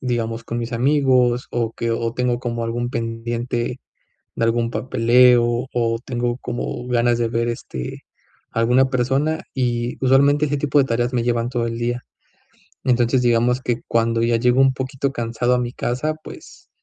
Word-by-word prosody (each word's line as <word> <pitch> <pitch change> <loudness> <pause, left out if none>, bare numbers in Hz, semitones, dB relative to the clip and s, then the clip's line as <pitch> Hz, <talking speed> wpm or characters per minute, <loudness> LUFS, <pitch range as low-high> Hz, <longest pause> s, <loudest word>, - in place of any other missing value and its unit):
digamos, 115 -2 -2
con 120 - -4
mis 120 +1 -4
amigos, 125 -1 +2
o 115 -2 -1
que 115 0 -3
o 115 0 -1
tengo 125 -1 0
como 120 -2 -3
algún 120 +1 -2
pendiente 120 +1 -3 0.5
de - - 0
algún 115 0 +1
papeleo, 120 +1 +3
o 115 -1 0
tengo 120 -1 -2
como 120 0 -5
ganas 120 -1 +2
de 115 -1 0
ver, 115 +1 -1
este, 65 - -6 0.5
alguna 125 +4 +2
persona, 135 +5 0
y 120 -2 -1
usualmente 140 +3 +4
ese 145 0 -1
tipo 145 0 +1
de 135 - +3
tareas 120 0 -1
me 120 - +1
llevan 120 0 0
todo 120 -2 -1
el 115 0 -4
día. 120 +1 -2 0.8
Entonces, 125 0 +2
digamos 120 +1 +2
que 120 -2 -2
cuando 115 0 +1
ya 115 0 +2
llego 125 +2 +2
un 135 0 +5
poquito 130 +1 -2
cansado 120 0 -1
a - - +2
mi 120 0 -2
casa, 130 +6 -2
pues, - - -12
120 Hz, 170 wpm, -21 LUFS, 115-125 Hz, 0.8 s, un